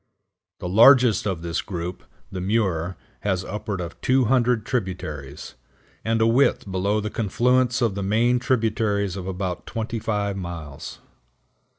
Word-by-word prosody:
The - - -5
largest 115 +1 +6
of 90 -4 -3
this 85 -1 -2
group, 90 -1 -5 0.3
the 95 -2 -4
Muir, 95 -4 0 0.2
has 95 -2 -1
upward 105 0 -4
of 85 -2 -7
200 125 -3 +2
tributaries, 75 - -4 0.5
and 115 0 +1
a - - +5
width 115 -4 +2
below 100 +3 +1
the 105 0 -4
confluence 125 +4 +1
of 115 -4 +1
the 100 - -4
main 115 +5 +2
tributaries 110 -6 0
of 95 -1 -6
about 95 -1 -4
twenty 115 0 -3
five 105 -2 -1
miles. 85 -6 -7
105 Hz, 135 wpm, -24 LUFS, 90-115 Hz, 0.5 s, largest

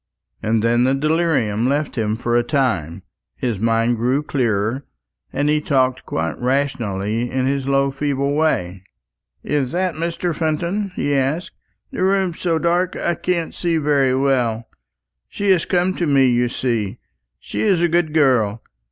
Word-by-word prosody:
And 110 0 0
then 120 +1 +3
the 130 +2 +2
delirium 140 -7 +1
left 145 +2 -1
him 110 -2 -1
for 120 0 -1
a 120 - +4
time, 110 - -1 0.3
his 120 -6 -2
mind 115 +2 +1
grew 125 +6 +1
clearer, 120 -2 -1 0.5
and 145 - -1
he 150 0 +2
talked 130 -3 0
quite 80 +1 -2
rationally 120 -4 -1
in 130 0 -1
his 135 0 -1
low 140 0 +2
feeble 140 0 -1
way. 95 - 0 0.6
"Is 140 -4 -1
that 185 0 0
Mr. 170 +1 -2
Fenton?" 170 +6 -1
he 145 - -1
asked; 140 +6 0 0.4
"the - - -2
room's 190 -3 +1
so 170 -3 +1
dark, 175 +2 +1
I 175 - 0
can't 170 0 -2
see 170 -2 0
very 140 -4 +2
well. 125 -4 0 0.6
She 200 -1 0
has 180 -4 +3
come 180 +1 +1
to 175 - 0
me, 140 -2 +4
you 120 -1 +2
see. 115 -4 -2 0.4
She's 195 -5 0
a 175 - +3
good 170 -1 +1
girl. 125 -8 +2
135 Hz, 155 wpm, -20 LUFS, 120-160 Hz, 0.6 s, a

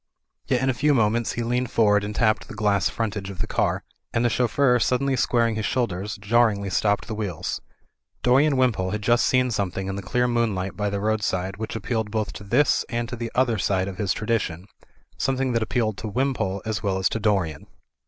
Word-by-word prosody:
Yet 125 0 +1
in 135 - +2
a - - -3
few 145 +4 +2
moments 115 0 +1
he 120 - -2
leaned 125 +1 -1
forward 105 -2 +3
and 105 +1 -4
tapped 110 -1 +1
the - - -9
glass 105 -3 +2
frontage 100 -3 -3
of 95 - -8
the - - -1
car, - - 0 0.3
and 115 +1 +1
the 120 - +2
chauffeur 125 +1 +3
sud 125 +3 +2
denly 140 0 0
squaring 115 -2 +2
his 110 -1 -2
shoulders, 105 -4 -2
jarringly 105 -2 +2
stopped 100 0 +1
the 110 - -5
wheels. 105 -6 -3 0.6
Dorian 135 +3 +4
Wimpole 115 -8 +2
had 105 +1 -3
just 120 +2 +3
seen 125 -1 +2
something 95 -3 -2
in 95 +1 -3
the - - -4
clear 125 +6 0
moonlight 110 -6 -1
by 105 0 -1
the 100 0 -2
roadside, 100 -3 -1
which 110 +1 -5
appealed 110 0 -2
both 110 0 -2
to - - -9
this 125 +9 +2
and 120 -1 -2
to 125 - -4
the 115 -1 -5
other 120 -4 +2
side 95 0 +1
of 95 -1 -7
his 100 -4 0
tradition; 100 -6 -1 0.5
something 135 -1 0
that 115 -1 +1
appealed 110 0 -1
to 110 - -5
Wimpole 110 -5 -1
as 110 -2 -2
well 100 -3 0
as 95 - +2
to 110 - -2
Dorian. 95 -9 0
110 Hz, 210 wpm, -24 LUFS, 100-120 Hz, 0.6 s, Dorian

